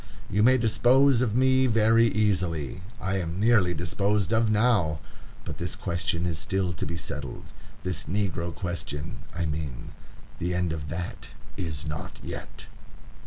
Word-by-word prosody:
You 105 - +2
may 130 +4 +6
dispose 125 +3 +4
of 115 -4 +1
me 130 +1 +4
very 115 0 +5
easily. 90 - 0 0.2
I 95 -1 -1
am 85 +1 -3
nearly 105 -5 +4
disposed 100 +4 0
of 110 0 +3
now; 105 -8 +3 0.5
but - - -6
this 90 +1 -1
question 85 -1 -1
is 85 -3 -1
still 95 +1 0
to 75 - -4
be 85 +2 -3
settled,—this 90 +1 -6
negro 85 -1 -1
question, 85 -5 -4 0.2
I 85 0 -1
mean; 75 -5 -4 0.5
the 90 +1 -1
end 90 -3 0
of 75 -2 -5
that 85 +2 -5 0.3
is 80 -4 -4
not 75 -1 -5
yet." - - -8
90 Hz, 145 wpm, -27 LUFS, 85-110 Hz, 0.5 s, may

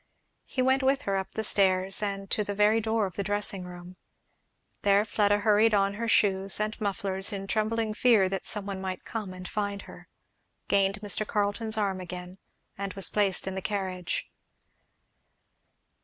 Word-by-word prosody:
He 255 - -1
went 265 +1 +3
with 270 +1 +1
her 195 - -1
up 190 0 -3
the 220 - -1
stairs, 190 -2 +3
and 195 -1 -3
to 210 - +2
the 205 0 -4
very 210 +2 +3
door 220 -1 0
of 190 - -6
the - - 0
dressing 205 -2 0
room. 180 0 -11 0.8
There 200 +1 +3
Fleda 205 -1 +2
hurried 215 +1 +4
on 200 0 +2
her 230 +3 -4
shoes 195 -3 +3
and 215 +1 -1
mufflers 195 -1 -1
in 195 -1 -5
trembling 215 +2 -1
fear 220 -4 +4
that 190 0 -3
some 210 -2 0
one 195 -1 -5
might 185 -1 -5
come 215 -4 -5
and 185 0 -8
find 205 -1 -3
her, - - -13 0.6
gained 195 +1 +1
Mr. 210 +1 +1
Carleton's 215 +1 -1
arm 195 -3 -1
again, 180 +1 -8 0.4
and 200 -1 -4
was 195 - +1
placed 200 -3 +2
in 190 - -3
the 190 - -4
carriage. 185 -3 -3
200 Hz, 170 wpm, -28 LUFS, 190-215 Hz, 0.8 s, hurried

